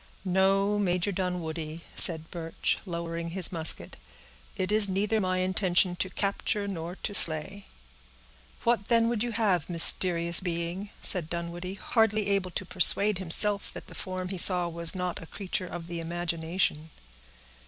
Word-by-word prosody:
"No, 195 +2 +1
Major 180 0 -1
Dunwoodie," 170 -4 -5
said 160 -2 -1
Birch, 165 -2 -3
lowering 170 -1 -5
his 180 0 +3
musket, 160 -3 +1 0.6
"it 185 +1 -3
is 210 -1 +3
neither 210 +3 -1
my 185 -1 -1
intention 185 -1 0
to 185 - -3
capture 200 +2 -3
nor 175 -2 -6
to 205 - -4
slay." 190 +3 +4 1.0
"What 235 -3 0
then 230 -1 +2
would 235 -3 -3
you 240 0 -2
have, 190 -9 -1
mysterious 170 0 +5
being?" 175 +2 -5
said 175 -5 +2
Dunwoodie, 175 +2 -6
hardly 215 -1 0
able 195 -2 -1
to 185 +2 -5
persuade 195 +2 +3
himself 200 +3 +4
that - - -10
the - - -14
form 185 -1 -6
he 190 -2 -5
saw 180 -1 +3
was 170 0 +1
not 180 -1 -4
a 165 - -12
creature 185 -1 -5
of 175 -1 -8
the 170 0 -7
imagination. 165 -1 -3
180 Hz, 150 wpm, -27 LUFS, 170-200 Hz, 1.0 s, mysterious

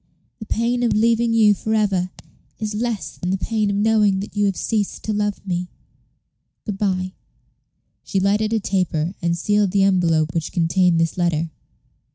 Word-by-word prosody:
The 220 - -8
pain 235 +2 0
of 235 -3 +2
leaving 230 +2 +2
you 220 -2 +5
for 220 +2 -2
ever 195 -4 +1 0.5
is 215 -1 -3
less 225 -1 -3
than 180 - -3
the 190 - +1
pain 215 +2 -1
of 200 - -1
knowing 210 -2 +3
that 205 - -8
you 205 0 +2
had 195 -2 0
ceased 210 -3 -2
to 215 - -2
love 205 -1 -2
me. 180 -1 -2 1.0
Good 205 -3 -4
by." 185 -2 -1 0.9
She 195 - -1
lighted 205 +3 +1
a 225 - +2
taper, 180 -4 -1
and 170 -1 0
sealed 205 +2 +2
the 195 +1 +2
envelope 165 -5 +2
which 165 -2 -2
contained 175 0 +2
this 165 +2 0
letter. 165 -2 0
200 Hz, 175 wpm, -21 LUFS, 180-215 Hz, 1.0 s, you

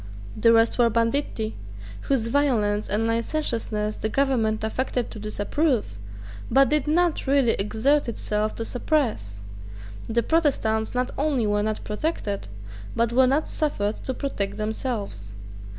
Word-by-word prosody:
The 230 - +4
rest 230 +2 +3
were 235 -1 +5
banditti, 230 -1 -1 0.5
whose 235 -5 +1
violence 225 -7 +1
and 210 +3 +1
licentiousness 230 -3 -1
the 220 - -2
Government 225 -5 +1
affected 245 +2 -2
to 220 - -8
disapprove, 215 - -1 0.5
but 275 0 +5
did 300 -1 +1
not 335 -1 +1
really 270 -4 +4
exert 230 +8 +1
itself 215 -1 -2
to 225 - -4
suppress. 235 - -1 0.7
The 235 +1 +1
Protestants 250 -9 +1
not 250 0 0
only 280 -6 +1
were 205 0 +1
not 215 0 -2
protected, 210 - -3 0.5
but 235 0 +1
were 255 +1 +5
not 280 +4 +1
suffered 215 -9 -1
to 260 - -4
protect 205 -9 -3
themselves. 215 - -3
230 Hz, 135 wpm, -24 LUFS, 215-275 Hz, 0.7 s, were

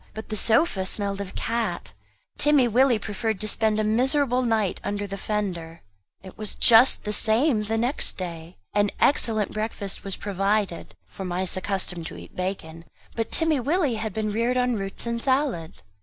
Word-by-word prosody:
But 220 - -7
the 215 - -3
sofa 220 - +2
smelt 200 0 -1
of 195 -1 -7
cat. 225 -6 -2 0.4
Timmy 295 -4 +4
Willie 245 +1 +4
preferred 215 0 -3
to 215 - -1
spend 215 0 +2
a - - +1
miserable 255 +4 +2
night 220 -6 0
under 205 0 -2
the 200 0 -5
fender. 180 -6 -4 0.4
It 190 +2 -12
was 215 -1 -3
just 235 +2 +6
the 210 - -2
same 225 +3 +3
next 225 +5 0
day. 170 -2 -7 0.2
An 205 0 +3
excellent 220 -7 +2
breakfast 215 -2 -3
was 195 -1 -3
provided 200 -2 -1
for 195 - -9
mice 180 0 -2
accustomed 185 -3 -3
to - - -9
eat - - -12
bacon; 170 -3 -5 0.3
but 225 -1 -2
Timmy 320 -3 +1
Willie 290 +1 +1
had 220 0 -3
been 215 +1 -2
reared 235 +4 0
on 250 0 +2
roots 195 0 -4
and 235 0 -2
salad. 260 - -1
215 Hz, 170 wpm, -25 LUFS, 195-235 Hz, 0.4 s, just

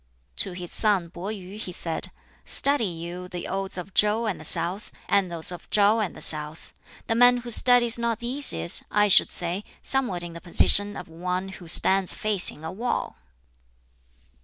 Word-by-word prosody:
To 190 - -1
his 175 -1 -9
son 195 -6 +1
Pih 195 +5 -7
yu 190 +2 -12
he 190 - -7
said, 165 -2 -5 0.3
"Study 280 -4 +2
you 175 +1 -8
the 180 -1 -8
Odes 195 -1 -5
of 185 +2 -8
Chow 210 +2 +1
and 210 -4 -4
the - - -11
South, 180 +6 +5 0.2
and 195 -3 0
those 170 0 +2
of 175 -1 -10
Shau 210 +2 +2
and 210 -4 -4
the - - -10
South. 150 0 0 0.3
The - - -1
man 245 +1 +4
who 240 - -3
studies 240 0 +3
not 235 -1 -2
these 255 +5 0
is, 80 +1 -1
I 210 0 +1
should - - +5
say, 175 +3 -3 0.2
somewhat 245 -10 -1
in 170 -1 -9
the 170 - -11
position 205 +3 +4
of - - -9
one 180 +3 -5
who 190 -2 -12
stands 190 +3 +2
facing 200 -7 +2
a 160 - -6
wall!" 235 +7 -4
190 Hz, 185 wpm, -24 LUFS, 175-215 Hz, 0.3 s, South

